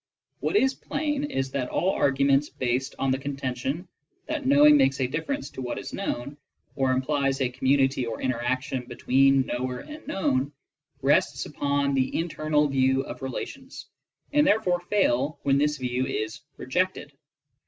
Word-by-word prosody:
What - - -1
is 265 -9 +4
plain 295 0 -2
is 135 - -2
that 130 -2 -2
all 190 - +1
arguments 140 0 +2
based 130 +1 -2
on 135 - 0
the 130 - 0
contention 140 +3 -3 0.4
that 305 -3 -3
knowing 295 +2 +7
makes 135 - +3
a 130 - +2
difference 165 - -3
to - - -7
what 125 -1 -4
is - - -7
known, 145 -7 -4 0.4
or 135 -1 +1
implies 135 +1 0
a 130 -2 +1
community 130 0 +1
or 115 - -4
interaction 130 0 -2
between 135 +2 +3
knower 125 0 -3
and 305 +1 -11
known, 140 -6 0 0.5
rest 140 - +2
upon 140 -1 0
the 130 -1 0
internal 155 -2 +1
view 130 -1 +2
of - - -8
relations, 260 - -6 0.5
and 295 0 +4
therefore 195 -9 +2
fail 155 -7 +1
when 140 0 +3
this 150 0 +1
view 125 0 -1
is 110 +6 -3 0.2
rejected. 180 +2 -1
135 Hz, 155 wpm, -26 LUFS, 130-175 Hz, 0.5 s, knowing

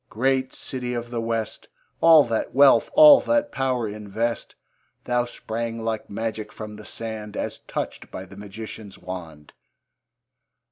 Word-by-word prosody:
great 130 +3 +1
city 125 -2 -4
of 120 0 -5
the 120 -1 -2
West! 115 -1 -3 0.3
All 165 -2 +8
that 115 0 -2
wealth, 140 0 +6
all 300 -2 +9
that 290 0 +1
power 130 -4 0
invest; 105 +3 -3 0.5
Thou 125 0 +1
sprang 115 -1 -5
like 110 -1 -3
magic 110 0 -4
from 105 0 -8
the 105 - -11
sand, 110 -2 -5
As - - -3
touched - - -5
by - - -7
the - - -14
magician's 105 0 -9
wand. 80 -5 -9
115 Hz, 140 wpm, -24 LUFS, 105-125 Hz, 0.5 s, all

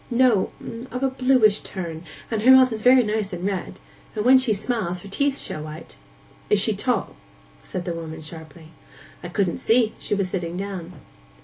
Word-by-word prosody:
'No—of 245 +1 0
a 270 - +2
bluish 255 -5 +3
turn, 170 -4 -6 0.3
and 220 -2 0
her 245 - +4
mouth 260 -1 +8
is 220 -1 -4
very 250 +2 +6
nice 210 -2 -2
and 175 +1 -4
red; 195 -3 -3 0.4
and 210 0 -2
when 260 +1 +7
she 255 -3 0
smiles, 200 -4 -1
her - - -9
teeth 280 +7 0
show 155 - -5
white.' 155 +1 -9 0.5
'Is - - +4
she - - +2
tall?' - - -1 0.5
said 180 - -6
the 175 - -2
woman 160 -1 -7
sharply. 160 0 -11 0.5
'I 175 - -7
couldn't 180 -2 0
see. 225 -1 +2
She - - -2
was 195 -2 0
sitting 175 -1 -4
down. 190 -3 -5
200 Hz, 180 wpm, -23 LUFS, 175-245 Hz, 0.5 s, mouth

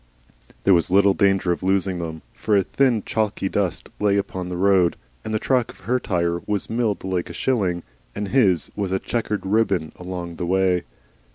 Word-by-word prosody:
There 95 - +5
was 85 0 +2
little 100 +1 +5
danger 95 -3 +2
of 85 - -2
losing 95 -1 +1
them, 80 -2 -5
for 105 -1 +1
a 100 - +3
thin 125 -1 +1
chalky 105 -3 -1
dust 95 -4 -2
lay 100 -1 +3
upon 95 -2 -3
the 90 - -4
road, 95 -2 +3 0.3
and - - -5
the 110 - +1
track 125 +1 +1
of - - -13
her 125 +2 0
tire 85 -5 0
was 105 -1 -1
milled 115 -3 0
like 95 -2 -2
a - - -7
shilling, 95 -9 0 0.3
and 105 -1 -3
his 100 -10 +2
was 100 -3 -2
a 95 - +2
chequered 105 0 -2
ribbon 95 -6 +1
along 90 -2 -6
the 90 - -2
way. 95 -1 +2
95 Hz, 190 wpm, -23 LUFS, 90-105 Hz, 0.3 s, There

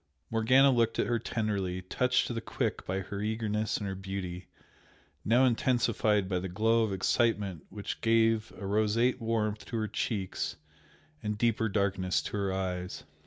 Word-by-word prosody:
Morgana 130 +5 +5
looked 115 -2 +2
at - - +2
her 120 -1 0
tenderly, 100 -5 -2
touched 125 +7 +1
to - - -3
the 115 - -3
quick - - -3
by 95 +1 -1
her 100 +1 -5
eagerness 110 0 -1
and 105 - -4
her 95 - -3
beauty, 95 -2 -5 0.8
now 120 +4 +4
intensified 115 -5 +2
by 90 -1 0
the 95 +1 -4
glow 110 +5 +2
of 110 -2 0
excitement 100 -2 0
which 100 0 -6
gave 115 -1 +3
a 100 - -6
roseate 110 +5 +2
warmth 110 -2 -1
to 115 - -3
her 110 -1 -1
cheeks 100 -2 -2 0.7
and 105 0 -2
deeper 115 -1 +1
darkness 95 -2 0
to - - -5
her 100 -1 0
eyes. 90 -1 -3
105 Hz, 165 wpm, -30 LUFS, 95-115 Hz, 0.8 s, Morgana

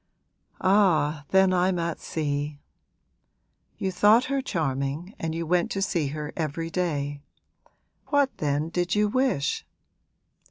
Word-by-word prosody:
'Ah, 165 -7 +3
then 190 -1 +4
I'm 180 0 +2
at 170 -1 -2
sea. 145 -1 -3 1.2
You 190 - -1
thought 210 +6 +5
her 275 - +1
charming 155 - -2
and 160 0 -3
you 165 0 -2
went 175 +1 +1
to 195 - -2
see 170 -5 0
her 150 +1 -5
every 165 +1 -3
day. 145 -5 -2 0.9
What 285 -2 +2
then 150 +1 0
did 180 +2 -1
you 210 0 +3
wish?' 250 - 0
170 Hz, 125 wpm, -26 LUFS, 150-190 Hz, 1.2 s, thought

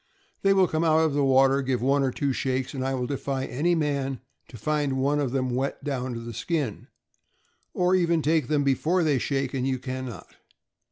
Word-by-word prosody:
They 195 - +3
will 190 -2 +4
come 160 0 -1
out 160 -1 +4
of 160 -3 +1
the 145 0 +1
water, 135 +1 +4
give 130 -2 -1
one 140 +3 +2
or 135 - +2
two 135 +2 -1
shakes, 130 +1 -2
and 130 -2 -3
I 135 0 -1
will 125 -1 -2
defy 135 -1 -3
any 170 +7 0
man 140 -4 -1 0.3
to 120 - -11
find 145 +3 0
one 140 +3 +1
of 140 -3 0
them 130 -1 -1
wet 135 +3 -2
down 130 -3 -3
to - - -4
the 115 0 -7
skin; 145 - -3 0.9
or 180 +1 +2
even 170 -3 +2
take 155 -4 +2
them 145 0 +1
before 155 +6 +1
they 145 -4 +2
shake, 135 +2 -1
and 130 -1 -1
you 130 -1 0
can 130 0 -5
not. 120 - -11
135 Hz, 215 wpm, -26 LUFS, 130-150 Hz, 0.9 s, will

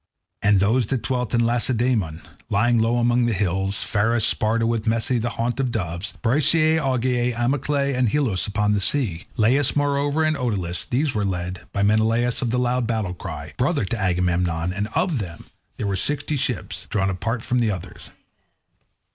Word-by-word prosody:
And 100 -1 +4
those 110 +4 +2
that 130 -1 -2
dwelt 125 -2 -2
in 120 -1 +2
Lacedaemon, 120 -8 +1 0.3
lying 115 +3 +2
low 115 +2 +2
among 120 0 +2
the 115 - +1
hills, 95 0 0
Pharis, 110 +1 +1
Sparta, 115 +1 +1
with 115 -1 -1
Messe 115 +2 +1
the 120 +2 -1
haunt 115 +1 -2
of 130 -2 +1
doves; 90 -3 -4
Bryseae, 155 +5 +4
Augeae, 125 -3 0
Amyclae, 140 +3 0
and 125 -2 +2
Helos 110 - +1
upon 105 0 0
the 105 - 0
sea; 95 - 0
Laas, 125 +5 +3
moreover, 145 +1 +1
and 155 0 +1
Oetylus; 100 - -2
these 135 +3 0
were 105 - -1
led 90 -1 -4
by 100 - -1
Menelaus 115 +3 +2
of 120 - -1
the 125 - 0
loud 125 -1 0
battle 110 -6 -1
cry, 80 -5 -7
brother 140 - +1
to 120 - -3
Agamemnon, 90 -2 0
and 105 +2 -2
of 170 -8 +1
them 85 -5 -7 0.3
there - - -3
were 100 -1 -1
sixty 145 +8 0
ships, 135 - -3
drawn 100 -2 0
up 90 - -5
apart 115 +4 -3
from 125 - 0
the 115 -2 +2
others. 95 -2 -7
115 Hz, 180 wpm, -22 LUFS, 100-125 Hz, 0.3 s, And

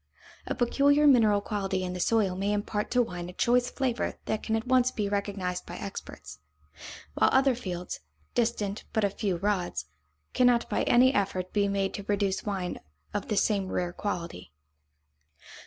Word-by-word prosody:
A - - -2
peculiar 285 +4 +3
mineral 220 -7 +5
quality 195 -2 -2
in 180 0 -3
the 180 - -5
soil 200 -2 +2
may 200 +2 0
impart 210 0 -2
to 250 0 +3
wine 175 -5 -6
a - - -9
choice 245 +4 +2
flavor 255 -3 -1
that 215 - -1
can 220 - -1
at 225 - -2
once 255 0 +4
be 210 -5 -2
recognized 200 -3 -2
by - - -7
experts; - - -8 0.7
while - - +3
other 265 0 +4
fields, 180 -7 -5 0.3
distant 220 -4 -1
but 220 -2 +1
a 200 - +2
few 195 -3 -1
rods, 180 - -1 0.5
cannot 245 -1 +3
by - - +1
any 255 +2 +5
effort 185 -3 -1
be 205 -1 +2
made 195 -1 -1
to 200 - -5
produce 200 -1 0
wine 190 -4 -3 0.3
of - - -3
the 210 - -1
same 200 -3 +2
rare 175 -1 -1
quality. 170 - -5
205 Hz, 170 wpm, -28 LUFS, 190-235 Hz, 0.7 s, mineral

